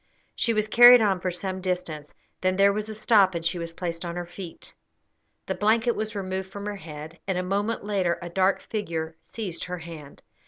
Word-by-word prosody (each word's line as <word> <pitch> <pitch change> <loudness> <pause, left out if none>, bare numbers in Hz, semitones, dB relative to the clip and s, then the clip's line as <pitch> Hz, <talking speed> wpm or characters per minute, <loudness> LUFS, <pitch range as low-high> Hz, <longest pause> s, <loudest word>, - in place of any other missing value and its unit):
She 230 - +1
was 215 -1 +1
carried 240 +2 +9
on 200 -4 +2
for 185 - -1
some 185 +1 -4
distance. 180 -5 -3 0.3
Then 185 0 +2
there 200 +1 +5
was 215 +1 -3
a 215 - -5
stop, 210 -4 +4
and 165 -1 -3
she 170 +1 0
was 170 0 -4
placed 170 -1 -4
on 170 -1 -4
her 175 0 -4
feet; 175 -1 -9 0.7
the - - -1
blanket 225 +3 +2
was 215 0 -4
removed 190 -1 -3
from 200 0 -7
her 205 -1 -4
head, 155 -1 -9
and 190 -2 0
a 180 - -1
moment 200 +4 -1
later 190 -4 0
a 175 - -7
dark 190 +2 +1
figure 165 -7 -4
seized 190 -7 -5
her 180 0 -4
hand. 165 -4 -11
185 Hz, 205 wpm, -26 LUFS, 170-210 Hz, 0.7 s, carried